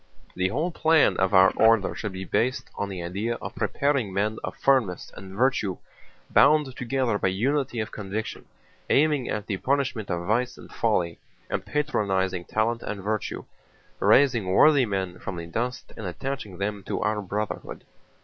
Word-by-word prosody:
"The 95 Hz, 0 st, +1 dB
whole 160 Hz, -, -1 dB
plan 160 Hz, -1 st, +4 dB
of 95 Hz, -1 st, +2 dB
our 95 Hz, -1 st, +7 dB
order 110 Hz, -3 st, +4 dB
should 105 Hz, -3 st, -5 dB
be 95 Hz, 0 st, -5 dB
based 125 Hz, +7 st, -1 dB
on 100 Hz, -, -3 dB
the 90 Hz, -3 st, -5 dB
idea 100 Hz, +7 st, -2 dB
of -, -, -7 dB
preparing 140 Hz, -8 st, 0 dB
men 105 Hz, +3 st, -1 dB
of -, -, -4 dB
firmness 125 Hz, -10 st, +1 dB
and 95 Hz, 0 st, -10 dB
virtue 110 Hz, -5 st, +1 dB, 0.5 s
bound 150 Hz, -4 st, +4 dB
together 125 Hz, -4 st, 0 dB
by -, -, +1 dB
unity 125 Hz, +6 st, 0 dB
of 110 Hz, -, -5 dB
conviction—aiming 120 Hz, +7 st, -2 dB
at 105 Hz, -1 st, -2 dB
the 100 Hz, -3 st, -2 dB
punishment 130 Hz, 0 st, -1 dB
of 85 Hz, -1 st, -2 dB
vice 120 Hz, +5 st, 0 dB
and -, -, -13 dB
folly, 85 Hz, -2 st, 0 dB, 0.3 s
and -, -, -2 dB
patronizing 95 Hz, -11 st, 0 dB
talent 115 Hz, +2 st, 0 dB
and 100 Hz, -2 st, -5 dB
virtue: 105 Hz, 0 st, -3 dB, 0.5 s
raising 125 Hz, -8 st, +4 dB
worthy 140 Hz, +4 st, +5 dB
men 95 Hz, -3 st, -3 dB
from 100 Hz, -, -5 dB
the 85 Hz, -1 st, -6 dB
dust 120 Hz, +9 st, -4 dB
and 110 Hz, -4 st, -6 dB
attaching 110 Hz, -1 st, -5 dB
them 100 Hz, +1 st, -2 dB
to -, -, -2 dB
our 105 Hz, 0 st, 0 dB
Brotherhood. 105 Hz, +2 st, -4 dB
110 Hz, 160 wpm, -26 LUFS, 95-130 Hz, 0.5 s, our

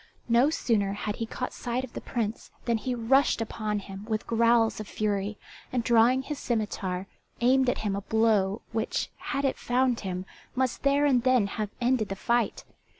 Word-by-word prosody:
No 240 Hz, +4 st, +4 dB
sooner 210 Hz, -10 st, +1 dB
had 210 Hz, +1 st, -3 dB
he 230 Hz, -, -3 dB
caught 255 Hz, -, -4 dB
sight 245 Hz, +2 st, -2 dB
of 260 Hz, -, -8 dB
the -, -, -5 dB
Prince 225 Hz, -3 st, -3 dB, 0.2 s
than 235 Hz, -2 st, +1 dB
he 250 Hz, +2 st, -2 dB
rushed 260 Hz, +4 st, +3 dB
upon 215 Hz, -1 st, -2 dB
him 195 Hz, 0 st, -7 dB
with 215 Hz, 0 st, -1 dB
growls 230 Hz, -1 st, +3 dB
of 215 Hz, -, -6 dB
fury, 205 Hz, -1 st, -1 dB, 0.3 s
and 245 Hz, -2 st, 0 dB
drawing 240 Hz, +3 st, +4 dB
his 295 Hz, +1 st, -5 dB
scimitar 195 Hz, -5 st, -2 dB, 0.3 s
aimed 255 Hz, +2 st, +4 dB
at -, -, 0 dB
him 200 Hz, -1 st, 0 dB
a 200 Hz, -, -3 dB
blow 215 Hz, -1 st, +2 dB
which, 225 Hz, 0 st, -1 dB
had 275 Hz, -1 st, -2 dB
it 270 Hz, -, 0 dB
found 250 Hz, -1 st, +1 dB
him, 185 Hz, -1 st, -4 dB, 0.3 s
must 255 Hz, -1 st, 0 dB
there 280 Hz, +1 st, +3 dB
and 260 Hz, -4 st, +4 dB
then 255 Hz, -3 st, +4 dB
have 210 Hz, +1 st, -3 dB
ended 245 Hz, -3 st, +1 dB
the 195 Hz, -, -3 dB
fight. 235 Hz, +2 st, 0 dB
230 Hz, 185 wpm, -28 LUFS, 210-250 Hz, 0.3 s, No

